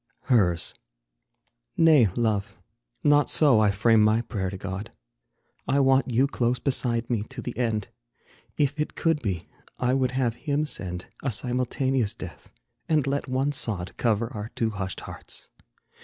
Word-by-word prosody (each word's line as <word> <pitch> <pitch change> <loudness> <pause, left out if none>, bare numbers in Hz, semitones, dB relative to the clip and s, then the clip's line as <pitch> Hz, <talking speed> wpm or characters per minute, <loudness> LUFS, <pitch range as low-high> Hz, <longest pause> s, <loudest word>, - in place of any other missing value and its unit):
HERS. 95 -10 +2 1.0
Nay, 155 -8 +6
Love, 105 -5 -1 0.5
not 145 0 +4
so 140 -8 +5
I 105 -1 +4
frame 110 +3 +4
my 110 +2 +4
prayer 100 -5 -3
to 95 - -6
God; 95 +2 -6 0.8
I 140 - +2
want 135 -1 +3
you 125 +4 +4
close 125 -3 0
beside 120 -4 0
me 115 -4 0
to 130 -1 -8
the 120 0 -5
end; 115 -3 -1 0.7
If 145 0 +1
it 150 - -2
could 165 -2 +1
be, 95 -7 -3 0.3
I 125 0 +1
would 130 -1 +1
have 120 -3 0
Him 145 +1 +1
send 90 -10 -3 0.2
A 135 - -1
simultaneous 125 0 0
death, 95 -7 -10 0.4
and 155 -4 +3
let 140 0 -2
one 135 +3 +1
sod 105 -10 -3
Cover 115 0 0
our 105 +1 -5
two 115 -1 0
hushed 95 -2 -5
hearts. - - -9
120 Hz, 155 wpm, -26 LUFS, 105-135 Hz, 1.0 s, Nay